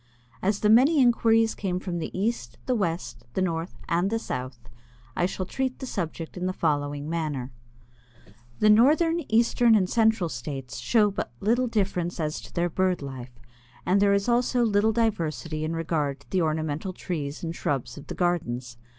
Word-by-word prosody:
As 200 +2 0
the 210 - +3
many 275 +7 +6
inquiries 225 -3 +4
came 185 -3 -2
from 180 -2 -4
the 160 - -3
East, 225 +5 -2
the 255 - +1
West, 165 - -2
the - - +1
North, 165 -1 -3
and 175 +3 +1
the 225 - 0
South, 130 - -5 0.6
I 175 - +2
shall 185 0 -4
treat 260 +6 -2
the 265 - -6
subject 165 -7 -4
in 180 0 -2
the 185 - -1
following 145 -3 -1
manner: 150 -6 -3 1.1
The 215 - +5
northern, 310 +9 +4
eastern, 230 +1 +4
and 190 -4 +3
central 220 -3 +2
states 135 -2 -6
show 215 -3 +3
but 165 - -4
little 240 +4 +2
difference 185 -6 -1
as 155 -1 -2
to - - -12
their 175 0 0
bird 185 -2 0
life, 130 -3 -8 0.5
and 195 +2 +3
there 200 0 +4
is 200 +2 0
also 245 0 +2
little 215 -1 +3
diversity 165 -8 -1
in 160 +1 -2
regard 150 -4 -1
to - - -23
the 185 - +2
ornamental 160 +2 -1
trees 150 -5 -5
and 165 0 -3
shrubs 140 -6 -2
of 145 - -11
the - - -6
gardens. 125 -9 -1
180 Hz, 175 wpm, -26 LUFS, 155-220 Hz, 1.1 s, many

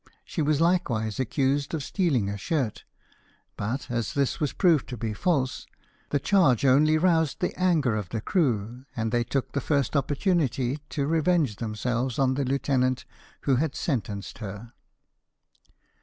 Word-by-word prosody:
She 165 - -3
was 150 -1 +2
likewise 130 - +1
accused 135 +4 0
of 150 - -3
stealing 140 - +1
a 100 - -2
shirt, 125 +1 -2 0.7
but, 120 +7 -3
as 115 -2 -2
this 140 -2 0
was 150 - 0
proved 170 -7 +2
to 125 - -5
be 110 0 -3
false, 140 - -1 0.4
the 145 - +1
charge 140 - +3
only 150 +4 +5
roused 160 -3 +2
the 180 - -1
anger 160 -11 +2
of 105 -5 -3
the 115 - -2
crew, 120 - -1
and 115 -1 -1
they 120 +1 +2
took 135 +2 -2
the 140 - -1
first 140 0 0
opportunity 140 - +1
to 140 - -1
revenge 160 - +1
themselves 120 +3 -2
on 130 -1 +3
the 140 +1 -1
lieutenant 130 -1 0 0.4
who 135 -3 +2
had 150 +1 -1
sentenced 105 - -3
her. 105 +2 -7
135 Hz, 155 wpm, -26 LUFS, 115-155 Hz, 0.7 s, only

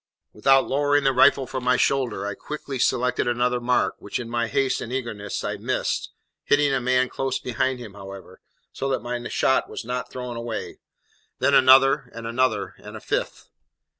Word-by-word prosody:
Without 135 +5 +4
lowering 145 +1 +2
the 135 -1 +3
rifle 135 +1 +5
from 130 0 -5
my 125 0 +3
shoulder, 130 -7 0
I 100 - -3
quickly 140 +3 -6
selected 125 0 +1
another 120 +1 +1
mark, 125 +1 +1
which, - - -4
in 115 -1 -7
my 120 0 0
haste 135 +2 0
and 120 - -6
eagerness, 115 -6 -4
I - - -3
missed, - - -2 0.3
hitting 145 -1 +3
a 135 - +1
man 125 +1 +2
close 135 0 -2
behind 130 +1 -1
him 115 -5 -10
however, 95 -2 -11 0.3
so 135 - -3
that 130 - -1
my 120 0 -4
shot 130 - +1
was - - -7
not 125 +1 -4
thrown 125 -2 -6
away; 115 -1 -5 0.6
then - - +2
another, 135 +1 +6
and 115 0 -7
another, 115 -3 0
and - - -9
a - - -9
fifth. - - -3
125 Hz, 180 wpm, -24 LUFS, 120-135 Hz, 0.6 s, another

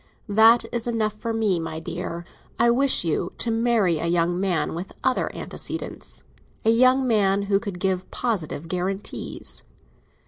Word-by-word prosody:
That 225 +3 +6
is 235 0 -2
enough 220 -3 0
for 230 +2 -4
me, 215 -6 +1
my 160 -1 -4
dear. 170 +1 -5 0.3
I 235 +1 +4
wish 270 -1 +3
you 170 +2 -1
to 235 - -1
marry 225 -7 +2
a 170 - -1
young 175 +1 +1
man 185 -4 0
with 175 +4 -6
other 260 - +1
antecedents—a 225 - -4
young 255 +3 +4
man 200 -3 +2
who 200 0 +2
could 200 -4 -6
give 185 -1 -1
positive 170 -9 -2
guarantees. 185 +3 -3
200 Hz, 145 wpm, -24 LUFS, 175-230 Hz, 0.3 s, That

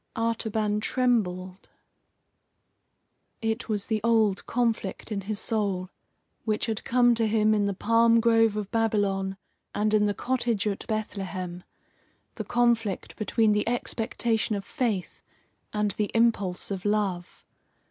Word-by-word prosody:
Artaban 220 -2 0
trembled. 195 -7 0 1.7
It 225 +1 -2
was 205 -2 -1
the 220 -2 -1
old 220 -4 +2
conflict 230 -3 -1
in 200 -2 -2
his 205 +1 -3
soul, 195 -4 -1 0.5
which 215 -2 0
had 225 -2 -3
come 245 0 +4
to 225 -1 +1
him 215 0 +3
in 205 -1 +2
the 200 -1 -1
palm 230 +3 +4
grove 225 -2 +4
of 210 -1 -4
Babylon 200 -4 0 0.4
and 210 +1 +1
in 210 -1 +4
the 205 -1 0
cottage 240 -4 -1
at 200 -2 -3
Bethlehem 190 -5 -4 0.7
the - - -5
conflict 235 -4 0
between 220 0 +2
the 210 +1 +1
expectation 225 -2 -1
of 200 -1 -5
faith 215 -8 -2 0.5
and 210 -1 0
the 210 +1 -2
impulse 205 -6 +1
of 190 -2 -3
love. 200 -4 -2
215 Hz, 130 wpm, -27 LUFS, 200-230 Hz, 1.7 s, come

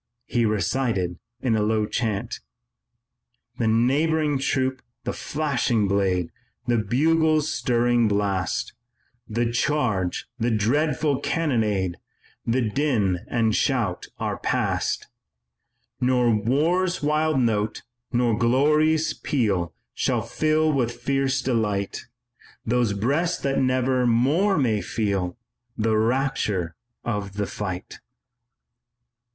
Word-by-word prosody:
He 120 -1 +1
recited 105 -5 0 0.2
in 125 -3 +1
a 110 - +2
sort - - +1
of 105 - +1
low 110 -1 +1
chant: 105 -3 -2 1.2
"The 115 - +1
neighing 145 +6 +2
troop, 130 -1 0 0.2
the - - -2
flashing 135 -8 0
blade, 95 -3 +1 0.3
The 120 -2 +2
bugle's 155 +7 +2
stirring 120 -2 +2
blast, 100 -2 -1 0.6
The 115 +2 0
charge, 120 -8 0
the 120 +1 +1
dreadful 135 +5 +1
cannonade, 110 - 0 0.5
The 120 0 +1
din 105 -8 +1
and 115 -2 +1
shout 120 -10 0
are - - -3
past. - - -1 0.9
"Nor 125 -2 +3
war's 160 - +1
wild 155 -1 +2
note, 110 -3 0 0.3
nor 120 -3 +2
glory's 150 +7 +3
peal 100 - 0 0.2
Shall - - 0
fill 155 0 +1
with 125 -4 +1
fierce 135 +2 0
delight 105 -6 -1 0.6
Those 120 -2 +1
breasts 145 - 0
that 135 -1 +1
never 130 -1 +2
more 145 - +3
may 115 -7 +1
feel 100 -4 -2 0.4
The 110 0 +1
rapture 110 -7 0 0.3
of 105 -4 -3
the 100 0 -2
fight." 95 -3 -5
120 Hz, 110 wpm, -24 LUFS, 105-140 Hz, 1.2 s, Nor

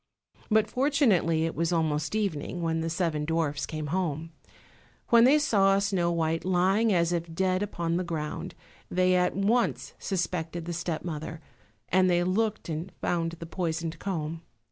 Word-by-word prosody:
But 215 -1 +4
fortunately 220 - +2
it 165 - -2
was 165 +1 -1
almost 155 0 0
evening, 175 -4 -2
when 165 0 0
the 165 - -2
seven 165 -3 -1
dwarfs 150 -2 -1
came 155 -1 -4
home. 165 -3 -2 0.8
When 235 0 +7
they 280 +4 +6
saw 195 -10 +3
Snow 190 -4 +1
white 165 -1 0
lying 190 +5 +2
as 170 -2 +2
if 170 -1 -2
dead 185 +1 +1
upon 170 -5 -1
the 185 - -1
ground 165 +1 -4 0.3
they 185 0 +2
at 180 0 +2
once 220 +5 +1
suspected 175 -3 -2
the 175 - -4
step 170 -1 -3
mother, 160 -1 -5 0.5
and 185 0 +4
they 175 0 +3
looked 215 +4 0
and 165 +3 -4
found 165 -1 -1
the 165 0 -8
poisoned 165 -1 -3
comb. 165 -4 -3
175 Hz, 160 wpm, -28 LUFS, 165-190 Hz, 0.8 s, When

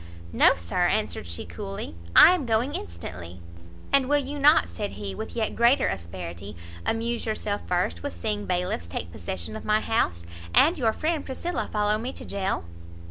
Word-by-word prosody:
"No, - - +6
Sir," 85 -1 0
answered - - -1
she 85 0 -4
coolly, 85 +2 -6 0.2
"I 350 - +10
am 315 -9 -2
going 230 +5 +1
instantly." 85 +1 -7 0.5
"And 275 -1 +4
will 290 - +5
you 285 +1 -3
not," 285 - +6
said 85 +4 -5
he, 100 -1 -5
with - - -6
yet 225 -2 -1
greater 245 +3 +4
asperity, 85 +2 -6 0.3
"amuse 230 +1 -1
yourself 210 -1 -2
first 180 0 0
with 285 - -5
seeing 210 -2 -2
bailiffs 180 - -1
take 85 0 -5
possession 90 +1 -5
of - - -7
my 215 0 +3
house, 90 - 0 0.3
and 330 +5 +6
your 225 -4 +3
friend 310 +5 -1
Priscilla 340 +7 -3
follow 210 0 +1
me 245 +4 -4
to - - -8
jail?" 195 - -2
205 Hz, 175 wpm, -26 LUFS, -, 0.5 s, I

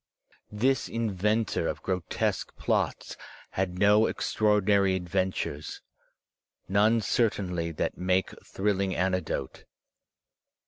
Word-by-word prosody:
This 125 +5 +1
inventor 110 -1 0
of - - -4
grotesque 90 -3 -2
plots - - -1 0.4
had 90 -1 -2
no 105 +3 +5
eirtra 110 - -1
ordinary 100 -2 +3
adventures, 90 -4 -3 0.8
none 105 +4 +3
certainly 95 -6 0
that - - -3
make 90 +1 +1
thrilling 100 -1 -1
anecdote. 90 0 -2
95 Hz, 90 wpm, -28 LUFS, 90-105 Hz, 0.8 s, no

